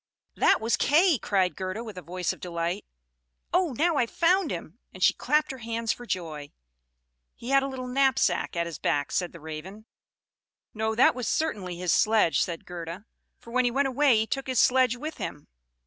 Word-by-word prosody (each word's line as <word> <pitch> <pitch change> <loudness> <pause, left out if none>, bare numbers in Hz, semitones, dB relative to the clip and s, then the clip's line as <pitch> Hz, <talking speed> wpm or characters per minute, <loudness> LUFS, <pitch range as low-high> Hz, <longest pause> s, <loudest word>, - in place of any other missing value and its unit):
"That - - +4
was 225 +1 +1
Kay," 320 -1 +4
cried 190 -3 +1
Gerda, 190 +4 -4
with 215 -4 -8
a 180 - -7
voice 180 +2 -3
of - - -14
delight. 170 +2 -3 0.7
"Oh, 355 -6 +2
now 320 +5 +1
I've 240 -4 +1
found 355 0 +2
him!" 175 +4 -6
and 185 - -5
she - - +6
clapped 300 +2 +1
her 265 - -8
hands 230 -1 -2
for 245 - -12
joy. 155 -7 -4 0.9
"He 235 - -9
had 275 0 +5
a 270 - -2
little 260 -2 -6
knapsack 250 -10 +1
at 170 0 0
his 170 -3 -7
back," 145 -1 0
said 180 -2 -1
the 170 - -12
Raven. 160 +7 -8 0.9
"No, 220 0 -1
that 245 - +5
was 250 -3 -4
certainly 200 - -1
his 180 -2 0
sledge," 215 -6 +3
said 170 -2 -3
Gerda; 175 +3 -7 0.3
"for 235 - -14
when 255 +1 +2
he 245 - +2
went 270 +3 +1
away 265 -2 +4
he 220 - +1
took 270 +4 -3
his 255 -3 +1
sledge 255 -1 +4
with 300 +5 -6
him." 145 - -6
225 Hz, 195 wpm, -27 LUFS, 180-265 Hz, 0.9 s, she